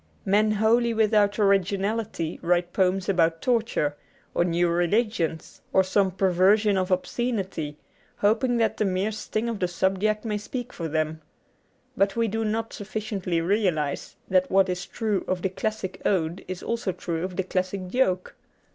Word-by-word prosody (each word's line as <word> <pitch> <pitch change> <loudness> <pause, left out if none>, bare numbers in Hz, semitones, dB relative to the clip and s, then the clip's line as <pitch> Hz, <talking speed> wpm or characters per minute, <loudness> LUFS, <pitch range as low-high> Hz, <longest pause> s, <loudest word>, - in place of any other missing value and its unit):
Men 210 +2 +3
wholly 230 +2 +3
without 210 -2 +3
originality 200 -3 0
write 175 0 +1
poems 190 0 +1
about 165 -4 +2
torture, 225 - 0 0.4
or - - +2
new 175 0 +1
religions, 175 -1 0
or 190 - +4
some 190 +1 +2
perversion 195 +3 +3
of 185 0 0
obscenity, 190 -6 -2 0.4
hoping 230 +4 +2
that 225 -1 +1
the 215 - +1
mere 190 +2 0
sting 215 +1 -3
of 230 -3 -3
the 180 - +1
subject 195 +5 0
may 210 -2 -1
speak 245 +3 -6
for 165 - -4
them. 155 0 -1 0.7
But 195 0 +2
we 230 0 +1
do 225 +2 -1
not 225 +1 -2
sufficiently 200 -4 -3
realize 170 -6 0
that 185 0 +2
what 190 0 +4
is 180 +1 -3
true 215 -4 -1
of 185 -1 -2
the 190 - +1
classic 190 0 -4
ode 170 -2 0
is 185 -1 -6
also 230 -4 -1
true 170 -2 -4
of 185 -1 -4
the 190 - 0
classic 185 +1 -2
joke. 185 -6 0
195 Hz, 155 wpm, -25 LUFS, 180-215 Hz, 0.7 s, or